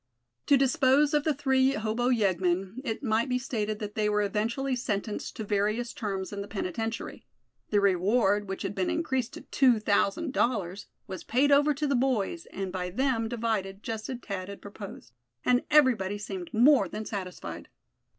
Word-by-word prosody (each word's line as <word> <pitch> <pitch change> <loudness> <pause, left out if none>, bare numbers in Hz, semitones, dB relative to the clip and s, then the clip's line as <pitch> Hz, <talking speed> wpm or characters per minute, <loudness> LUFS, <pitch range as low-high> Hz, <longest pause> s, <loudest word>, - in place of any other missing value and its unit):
To 280 - +6
dispose 275 +1 +3
of 295 -1 +2
the 310 - +3
three 265 -1 +2
hobo 225 +2 0
yeggmen, 190 -1 +1
it 230 0 -4
might 230 +1 +1
be 250 - +1
stated 215 -5 -2
that 210 -1 -6
they 210 -1 +1
were 210 0 +2
eventually 230 +6 -1
sentenced 210 -3 -3
to 220 - -4
various 215 +4 0
terms 195 -3 -4
in 200 - -4
the 200 - -6
penitentiary. 225 +3 -4 0.5
The 205 - +3
reward, 200 +2 +2
which 195 - -4
had - - -3
been 190 -2 -1
increased 265 -7 -1
to - - -8
two 250 -5 +3
thousand 210 +7 +1
dollars, 200 -7 -1 0.2
was 190 - -7
paid 275 +5 +2
over 290 +1 +5
to 300 +2 -1
the 280 - +1
boys, 260 - 0
and 195 -1 -5
by 180 -1 -3
them 230 +1 0
divided, 220 -4 -2
just 220 -1 -4
as 255 - -3
Thad 190 -2 -5
had 200 - -8
proposed. 200 - -10 0.3
And 250 0 +3
everybody 235 -10 +4
seemed 195 -4 -6
more 245 -2 +5
than 215 +3 -5
satisfied. 190 -4 -6
220 Hz, 175 wpm, -28 LUFS, 200-260 Hz, 0.5 s, To